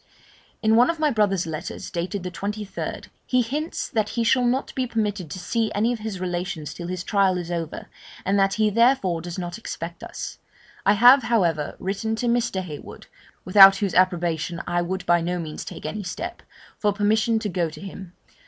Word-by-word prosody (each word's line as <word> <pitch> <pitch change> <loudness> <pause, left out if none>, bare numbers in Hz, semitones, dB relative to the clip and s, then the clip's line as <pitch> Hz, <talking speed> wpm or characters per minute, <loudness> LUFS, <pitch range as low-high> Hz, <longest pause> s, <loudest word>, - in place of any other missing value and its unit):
'In 220 0 +4
one 245 +5 +5
of 335 - 0
my 305 -1 +2
brother's 200 -6 +1
letters, 160 -2 -6
dated 175 +2 -3
the 180 - -4
23rd, 205 +4 -5 0.2
he 255 -1 +3
hints 295 +7 -3
that 215 -4 -1
he 235 - -1
shall 250 +2 +3
not 260 +3 -1
be 255 -1 -1
permitted 205 -7 -2
to 185 - -6
see 220 +4 -1
any 225 +4 +2
of 235 - -5
his 215 -3 -5
relations 175 -3 -3
till 175 - -7
his 180 -1 -4
trial 195 -2 +2
is 175 -1 -5
over, 165 -2 -4 0.4
and 200 +1 +2
that 195 0 +3
he 215 -1 +2
therefore 230 -7 +3
does 175 +1 -6
not 175 +3 -5
expect 170 -5 -6
us. - - -7 0.5
I 200 - +7
have, 245 +6 +7
however, 170 - +1
written 200 +4 -2
to 235 - -3
Mr. 235 -5 +1
Heywood 150 -5 -9 0.4
(without 195 +1 +9
whose 195 -1 -1
approbation 175 -2 +1
I 175 0 0
would 180 +1 -3
by 175 -1 +4
no 175 +2 -1
means 160 -3 -5
take - - -9
any 205 +7 -3
step) 180 -2 -5 0.4
for 210 - +2
permission 215 +2 +2
to 220 - -2
go 175 -4 -1
to 155 - -11
him. 190 -2 -9
195 Hz, 195 wpm, -24 LUFS, 175-220 Hz, 0.5 s, without